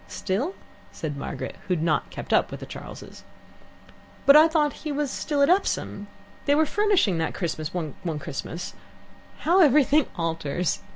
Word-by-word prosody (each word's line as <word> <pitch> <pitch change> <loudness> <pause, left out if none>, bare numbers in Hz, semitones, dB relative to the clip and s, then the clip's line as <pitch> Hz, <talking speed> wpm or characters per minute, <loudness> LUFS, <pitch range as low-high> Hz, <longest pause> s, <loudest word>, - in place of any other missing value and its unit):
"Still?" 250 - -2 0.4
said 150 -3 -5
Margaret, 140 - -5
who 180 - +2
had 160 - -2
not 160 -2 +1
kept - - -5
up - - +3
with - - -7
the - - -7
Charles'. - - -10 1.0
"But 280 - +8
I 310 +2 +9
thought 305 -3 +1
he 305 - -3
was 285 -1 -1
still 290 -2 0
at 280 - +4
Epsom. 360 - 0 0.4
They 285 - +5
were 315 +1 +4
furnishing 375 - +2
that 160 - -2
Christmas 155 -4 -3
one 160 -6 -4 0.2
Christmas. 155 +4 -6 0.7
How 355 +4 +4
everything 295 -1 +5
alters! 165 0 -1
265 Hz, 160 wpm, -25 LUFS, -, 1.0 s, I